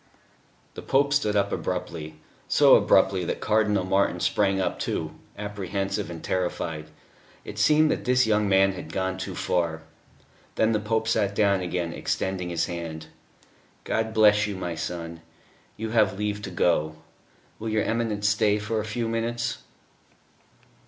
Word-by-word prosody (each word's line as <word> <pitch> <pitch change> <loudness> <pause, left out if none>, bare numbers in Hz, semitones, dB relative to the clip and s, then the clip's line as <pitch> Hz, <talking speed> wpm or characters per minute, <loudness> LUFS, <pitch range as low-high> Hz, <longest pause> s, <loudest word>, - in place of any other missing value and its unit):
The - - -8
Pope 140 +1 +2
stood 110 -7 +1
up 100 - +1
abruptly 80 -2 -4 0.3
so - - +6
abruptly 95 -2 +3
that - - -3
Cardinal 105 -2 +2
Martin 95 +2 +1
sprang 95 -2 +1
up 95 - -1
too, - - -2 0.3
apprehensive 100 -1 -3
and 85 -2 -8
terrified. 85 -4 -2 0.6
It - - -7
seemed 155 0 +4
that - - -2
this 125 0 +3
young 105 -2 +2
man 95 0 +4
had 90 -4 -8
gone 95 +1 -2
too 95 - -5
far. 85 -2 -1 0.7
Then 110 - +2
the 110 - +1
Pope 110 +1 -1
sat 100 -3 +1
down 100 -2 +3
again, 90 -1 -2
extending 95 -2 -2
his 85 -1 0
hand. 85 -2 -6 0.7
"God 110 0 -1
bless 105 -1 +4
you, 105 - -4
my 90 -2 -4
son. 85 0 -5 0.6
You 110 0 -4
have 105 -4 +2
leave 105 0 -2
to - - -6
go.... 80 -3 +1 0.6
Will 110 - -4
your 110 0 +1
Eminence 110 -3 -1
stay 105 0 +3
for 110 +1 -2
a 105 - -3
few 115 +2 -2
minutes?" 115 +1 -2
100 Hz, 150 wpm, -26 LUFS, 90-110 Hz, 0.7 s, so